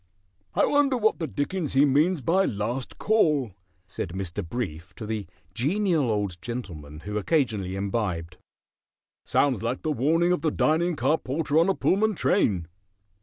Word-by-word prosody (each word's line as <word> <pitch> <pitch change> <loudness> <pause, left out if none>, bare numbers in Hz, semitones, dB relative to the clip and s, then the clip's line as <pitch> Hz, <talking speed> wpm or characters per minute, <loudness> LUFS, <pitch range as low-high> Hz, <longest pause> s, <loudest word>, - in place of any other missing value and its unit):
"I - - +4
wonder 285 -3 +3
what 220 -4 +2
the 160 - -2
dickens 155 +3 -2
he 135 +2 +5
means 150 +4 +2
by 185 +9 +2
'Last 115 +5 -3
Call,'" 150 - +2 0.3
said 85 -1 -5
Mr. 95 +1 -4
Brief 85 -5 -5
to 110 - -7
the 105 -3 -3 0.3
Genial 160 - +1
Old 100 -5 -2
Gentleman 80 -11 -7
who 105 +3 -3
occasionally 105 - 0
imbibed. 95 -4 -2 0.9
"Sounds 135 -7 +2
like 120 +3 -2
the 155 - 0
warning 160 +6 +2
of 180 - +1
the 160 - +2
dining 165 +3 +1
car 155 +2 +1
porter 150 +3 0
on 170 +4 +3
a 195 - +2
Pullman 215 +2 +2
train." 100 - +1
130 Hz, 155 wpm, -26 LUFS, 100-165 Hz, 0.9 s, he